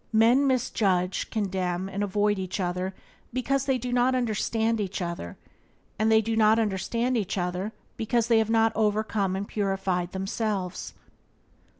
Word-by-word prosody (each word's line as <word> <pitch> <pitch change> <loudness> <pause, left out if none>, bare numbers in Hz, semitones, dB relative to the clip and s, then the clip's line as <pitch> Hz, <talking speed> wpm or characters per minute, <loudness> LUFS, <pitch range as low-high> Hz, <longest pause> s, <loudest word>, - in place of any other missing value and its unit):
Men 235 +5 +5
misjudge, 195 -8 +1
condemn, 190 -3 -1
and 195 +1 -4
avoid 205 0 +1
each 185 +1 -4
other 180 +1 -2 0.4
because 270 +2 0
they 265 -1 +2
do 250 0 -4
not 250 +1 +3
understand 225 -1 0
each 195 0 -3
other, 170 - -5 0.6
and 220 +1 +3
they 220 0 +6
do 225 +1 -1
not 220 0 +5
understand 230 +4 0
each 210 -3 -1
other 180 +3 -2 0.3
because 230 0 +1
they 230 -2 +5
have 220 0 0
not 225 0 +4
overcome 210 -2 +1
and 200 +1 -3
purified 195 -3 -1
themselves. 195 -1 -3
210 Hz, 150 wpm, -27 LUFS, 190-225 Hz, 0.6 s, they